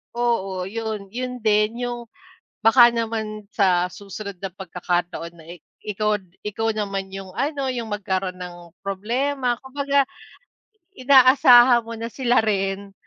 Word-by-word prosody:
Oo 195 -6 -1
'yon, 210 0 -5
'yon 250 0 -5
din 215 +2 +2
yung 240 -1 -4 0.6
baka 235 +2 +8
naman 220 -2 -3
sa 180 -4 +2
susunod 200 -1 -8
na 195 - -3
pagkakataon 175 -2 -4
na 165 - -15
i 175 - -11 0.2
ikaw 210 +1 0 0.2
ikaw 225 +2 -2
naman 195 -3 -4
yung 195 -1 -8
ano, 280 -2 -1
yung 235 -4 -3
magkaroon 190 -2 -2
ng 175 -1 -9
problema 240 +6 -1
kumbaga 280 0 0 0.9
inaasahan 255 -3 +6
mo 230 0 -8
na 230 - -4
sila 250 -2 +2
rin 195 -1 -1
215 Hz, 130 wpm, -22 LUFS, 195-240 Hz, 0.9 s, baka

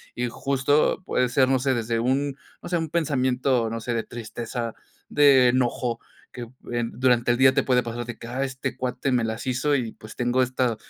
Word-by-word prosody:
Y 125 0 -1
justo 140 +7 +1
puede 125 -1 +1
ser, 130 +1 +3
no 130 0 +2
sé, 130 +1 +1
desde 115 0 -1
un, 135 +3 0 0.3
no 175 - -7
sé, 175 - +1
un 165 -1 -3
pensamiento, 130 -6 +1
no 115 +1 -4
sé, 120 +1 -3
de 115 - -1
tristeza, 115 0 -5 0.4
de 135 -4 +6
enojo, 120 -1 0 0.3
que 120 -1 -7 0.4
durante 125 -1 +2
el 120 - +1
día 130 0 +6
te - - +2
puede 125 -2 +2
pasar 120 0 -5
de 120 - -7
que, 115 - -10
ah, 130 +3 -2
este 130 -1 -4
cuate 130 +1 -2
me 120 -2 +2
las 110 0 -3
hizo 135 +3 +1
y, 120 -5 -2
pues, 110 - -12
tengo 120 +1 +1
esta 125 -2 0
125 Hz, 205 wpm, -24 LUFS, 120-135 Hz, 0.4 s, de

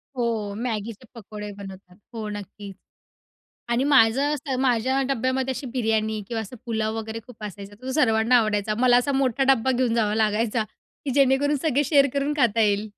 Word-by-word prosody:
हो, 225 -4 -2
मॅगीचे 225 0 -4
पकोडे 210 -1 -8
बनवतात. 190 -2 -11 0.2
हो, 220 -2 -5
नक्कीच. 205 -1 -8 0.9
आणि 240 +3 +1
माझं 275 +1 +4
असं 275 -2 -3
माझ्या 260 +1 +1
डब्यामध्ये 260 0 0
अशी 265 +1 -6
बिर्याणी 220 -3 0
किंवा 230 -2 -2
असं 235 +4 -10
पुलाव 220 -1 -1
वगैरे 220 0 -5
खूप 230 -4 -14
असायचा. 200 0 -8
तो 260 0 -4
सर्वांना 230 -4 +3
आवडायचा. 215 -1 0
मला 245 -1 +5
असा 275 +3 +1
मोठा 270 -1 +1
डब्बा 260 +1 0
घेऊन 245 -2 +1
जावा 215 -2 +1
लागायचा, 220 +1 +1 0.4
की 275 - -2
जेणेकरून 280 +1 +3
सगळे 290 -2 +2
शेअर 280 -1 +4
करून 280 +1 0
खाता 235 -5 +2
येईल. 205 -1 +2
230 Hz, 165 wpm, -24 LUFS, 215-265 Hz, 0.9 s, मला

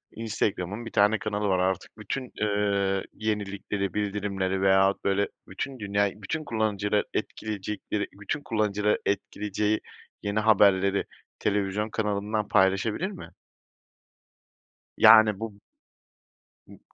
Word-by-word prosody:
Instagram'ın 105 -1 -2
bir 115 - -7
tane 105 +2 +3
kanalı 105 -1 -2
var 95 -2 +2
artık, 95 +2 -1
bütün, 120 +5 -5
eee, 100 -2 +1
yenilikleri, 100 -3 -3
bildirimleri 100 -2 -1
veyahut 95 0 +3
böyle, 100 +1 +1 0.2
bütün 135 -2 -5
dünyayı, 100 0 0
bütün 155 +11 -3
kullanıcıları 105 -4 0
etkileyecekleri, 105 0 -3
bütün 145 +9 -3
kullanıcıları 105 -1 +1
etkileyeceği 105 +1 -1 0.4
yeni 100 +1 0
haberleri 100 -2 +4 0.3
televizyon 100 +1 0
kanalından 105 0 -1
paylaşabilir 105 - +2
mi? 195 - -9 1.7
Yani 110 -3 +7
bu 105 -2 -7 1.1
b - - -15
105 Hz, 105 wpm, -27 LUFS, 100-110 Hz, 1.7 s, Yani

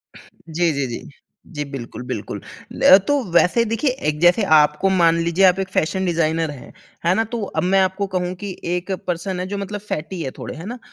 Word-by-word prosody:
जी, 170 +1 -3
जी, 140 -1 -1
जी। 120 - -7 0.5
जी 145 - -2
बिल्कुल, 125 -2 -7
बिल्कुल। - - -5 0.5
अ, 190 - +10
तो 290 - +3 0.2
वैसे 180 +7 +4
देखिए 230 +6 0 0.2
एक 150 0 -1
जैसे 175 +5 +4
आपको 150 +5 +3
मान 170 -3 +4
लीजिए 170 +3 +3
आप 185 0 +4
एक 190 - -1
फैशन 190 +4 0
डिज़ाइनर 165 -2 0
हैं, 140 - -11 0.3
है 170 - +4
ना? 225 - +2
तो 225 +1 -5
अब 195 - -2
मैं 190 +2 +3
आपको 190 +2 0
कहूँ 180 0 -1
कि 200 - -4 0.2
1 180 +2 -4 0.2
पर्सन 180 +1 -2
है 180 - -2
जो 200 +1 -4
मतलब 200 +1 -4
फैटी 180 -3 -5
है 130 - -4
थोड़े। - - -7
है 165 - -8
ना? 240 +4 -6
180 Hz, 210 wpm, -21 LUFS, 160-195 Hz, 0.5 s, अ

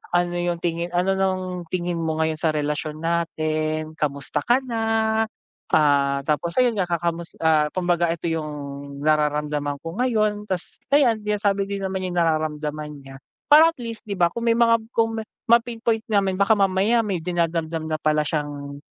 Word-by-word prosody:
ano 175 0 +1
yung 175 -1 -1
tingin 170 0 -1
ano 180 +2 +2
ng 185 -2 -1
tingin 175 0 -2
mo 160 -1 -1
ngayon 160 0 0
sa 160 -2 +1
relasyon 150 +1 -3
natin? 155 -2 -1
Kamusta 140 -3 -2
ka 245 +3 +3
na? 235 -3 -3 0.9
Ah, 140 -2 +3
tapos 170 +3 0
ayun 240 -3 +2
nga 190 - +1
kakamus 170 0 -2
ah, 155 -2 +4
kumbaga 175 -2 +1
ito 170 0 -4
yung 160 -2 -2 0.5
nararamdaman 150 -1 0
ko 165 +4 -7
ngayon 215 -4 +1
tas, 185 -4 -4 0.2
ayan 260 -6 +5
sinasabi 205 -1 +1
din 200 0 -4
naman 190 -1 -2
niya - - -2
yung 175 - +1
nararamdaman 155 -2 -1
niya. 135 0 -12 0.3
Para 315 +3 +7
at - - -62
least 230 -1 -7
di 205 - -3
ba 175 -3 +3
kung 235 +6 -5
may 230 - +4
mga 230 -1 +5 0.2
kung 225 0 +1
ma - - -4 0.3
ma-pinpoint 230 -1 +2
namin 195 -3 +1
baka 200 +3 +4
mamaya 200 +3 +3
may 200 -4 -2
dinadamdam 165 -2 -2
na 155 - +1
pala 155 0 +2
siyang, 145 -2 -4
170 Hz, 170 wpm, -23 LUFS, 155-205 Hz, 0.9 s, Para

